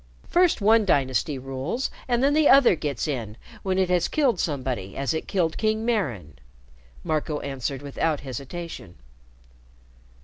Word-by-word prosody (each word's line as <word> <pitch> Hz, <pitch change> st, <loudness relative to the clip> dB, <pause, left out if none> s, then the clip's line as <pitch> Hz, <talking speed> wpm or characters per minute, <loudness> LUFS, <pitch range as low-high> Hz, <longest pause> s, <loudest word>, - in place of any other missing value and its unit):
First 350 Hz, -8 st, +3 dB
one 220 Hz, +2 st, +5 dB
dynasty 140 Hz, -4 st, +1 dB
rules, 135 Hz, -, -3 dB, 0.2 s
and 240 Hz, 0 st, +1 dB
then 280 Hz, +1 st, +4 dB
the 305 Hz, -1 st, +4 dB
other 270 Hz, -8 st, +7 dB
gets 145 Hz, -5 st, -3 dB
in 115 Hz, -7 st, -4 dB, 0.2 s
when 190 Hz, -1 st, -1 dB
it 190 Hz, -1 st, +2 dB
has 180 Hz, -1 st, +2 dB
killed 265 Hz, -, +1 dB
somebody 130 Hz, -, -3 dB
as 140 Hz, +3 st, -1 dB
it 160 Hz, -, -4 dB
killed 170 Hz, -5 st, 0 dB
King 220 Hz, 0 st, 0 dB
Maran," 125 Hz, -, -2 dB, 0.6 s
Marco 155 Hz, -1 st, -1 dB
answered 135 Hz, 0 st, -4 dB
without 145 Hz, +2 st, -1 dB
hesitation. 135 Hz, -, -7 dB
155 Hz, 140 wpm, -25 LUFS, 135-215 Hz, 0.6 s, other